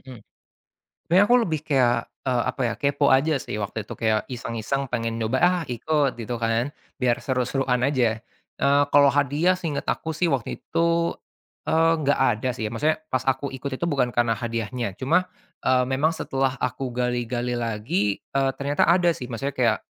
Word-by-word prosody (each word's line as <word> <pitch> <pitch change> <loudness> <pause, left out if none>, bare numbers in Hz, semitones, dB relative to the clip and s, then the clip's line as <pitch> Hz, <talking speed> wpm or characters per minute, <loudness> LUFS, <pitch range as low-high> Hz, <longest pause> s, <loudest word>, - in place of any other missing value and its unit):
Mhm. 130 -2 -11 0.9
Sebenernya 185 +4 +5
aku 245 - +6
lebih 160 -5 -2
kayak, 120 -5 +2 0.2
eee, 125 -2 +1
apa - - -12
ya, - - -5
kepo 140 0 +2
aja 145 +4 +3
sih - - -5
waktu 105 +1 -4
itu, - - -9
kayak 110 -2 +1
iseng-iseng 125 +2 -3
pengen 115 -2 -1
nyoba 115 +4 0
ah 180 0 +3
ikut, 140 +3 0
gitu 120 +2 -3
kan, 115 +5 0 0.3
biar 125 -2 +2
seru-seruan 125 0 0
aja, 120 -5 +1 0.4
eee, 140 +1 +4
kalau 145 -1 +7
hadiah 145 +6 +2
seinget 160 -5 -3
aku 160 - -1
sih 175 +1 +1
waktu 130 -4 -2
itu, 170 0 +1 0.6
eee, 165 +1 +4
enggak 145 -1 +1 0.2
ada 120 +4 -3
sih, 110 -3 -2
maksudnya 155 +7 0
pas 130 -1 0
aku 135 +1 -1
ikut 135 +1 -5
itu 170 - -3
bukan 135 -5 +1
karena 120 -1 +3
hadiahnya. 115 -1 -3
Cuma, 165 - +1 0.4
eee, 130 -1 +3
memang 140 +5 +1
setelah 135 -2 -1
aku 125 +1 -2
gali-gali 125 0 -1
lagi, 105 -3 -1
eee, 135 0 0
ternyata 140 +3 +1
ada 175 0 +4
sih, 125 -5 -8
maksudnya 135 +4 -3
kayak 115 -4 +2
130 Hz, 170 wpm, -24 LUFS, 120-145 Hz, 0.9 s, kalau